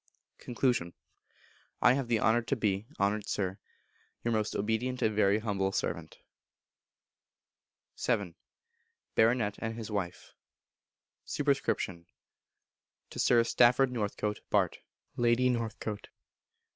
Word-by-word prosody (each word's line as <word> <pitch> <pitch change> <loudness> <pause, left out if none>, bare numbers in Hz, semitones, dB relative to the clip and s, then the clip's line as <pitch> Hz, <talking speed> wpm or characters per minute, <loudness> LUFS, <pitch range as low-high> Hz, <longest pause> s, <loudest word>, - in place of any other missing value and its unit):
Con. 125 - -8 1.2
I 125 - +6
have 135 -2 -1
the 115 -2 +2
honour 110 +3 +3
to 130 +4 -1
be, 105 -2 -1
Honoured 100 +1 +1
Sir, 95 0 -2 0.6
Your 120 - 0
most 110 -1 0
obedient 110 +5 -1
and 110 -1 +1
very 105 -1 +4
humble 100 -3 -1
servant. - - -3 1.9
vii. 100 -8 0 0.8
Baronet 110 -2 +2
and 115 0 -3
His 115 -1 -6
Wife. 90 -6 -4 0.9
Sup. 145 - -3
To 95 - -5
Sir 120 -2 +5
Stafford 125 +2 +4
Northcote, 105 -2 -2
Bart. - - +1 0.4
(Lady 120 +1 +3
Northcote). 110 -3 -3
110 Hz, 105 wpm, -31 LUFS, 100-120 Hz, 1.9 s, I